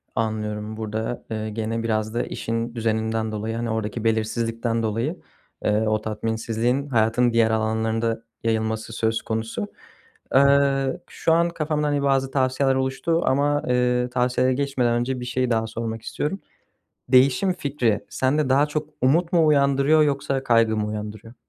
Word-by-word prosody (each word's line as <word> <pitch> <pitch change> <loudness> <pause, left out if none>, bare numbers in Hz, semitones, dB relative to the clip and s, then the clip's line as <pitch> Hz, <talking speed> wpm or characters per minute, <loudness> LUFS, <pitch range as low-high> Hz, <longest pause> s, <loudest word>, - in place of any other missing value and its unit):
Anlıyorum. 110 -1 -2
Burada, 110 +2 -4
eee, 110 0 -3
gene 115 +1 -3
biraz 110 -1 -1
da 120 - 0
işin 115 +1 -3
düzeninden 110 -1 -1
dolayı, 110 +1 -3
hani, 115 0 -2
oradaki 110 +1 -3
belirsizlikten 115 +1 0
dolayı, 115 - -2 0.4
eee, 105 +1 +2
o 110 0 +1
tatminsizliğin 115 +5 -1
hayatın 120 0 +2
diğer 115 -1 +3
alanlarında 110 +1 0 0.2
yayılması 110 0 -1
söz 115 0 0
konusu. 110 - -3 0.7
Eee, 140 -1 +3
şu 165 - +1
an 170 +1 +3
kafamda, 155 -2 -1
hani, 145 -1 0
bazı 135 -1 +1
tavsiyeler 130 0 +1
oluştu 135 +6 0
ama, 145 +2 +2
eee, 125 0 +1
tavsiyelere 125 +1 +1
geçmeden 130 -3 0
önce 125 +2 -1
bir 125 - -5
şey 125 +1 -1
daha 110 -1 +1
sormak 115 0 -4
istiyorum. 155 - -3 0.7
Değişim 130 +8 +4
fikri 135 - -1
sende 135 +2 0
daha 140 +3 +4
çok 150 0 -3
umut 160 +7 +2
mu 165 -3 +4
uyandırıyor 140 +1 +4
yoksa 140 -2 0
kaygı 115 -3 +3
mı 105 0 -1
uyandırıyor? 105 +2 -6
120 Hz, 145 wpm, -23 LUFS, 110-135 Hz, 0.7 s, Değişim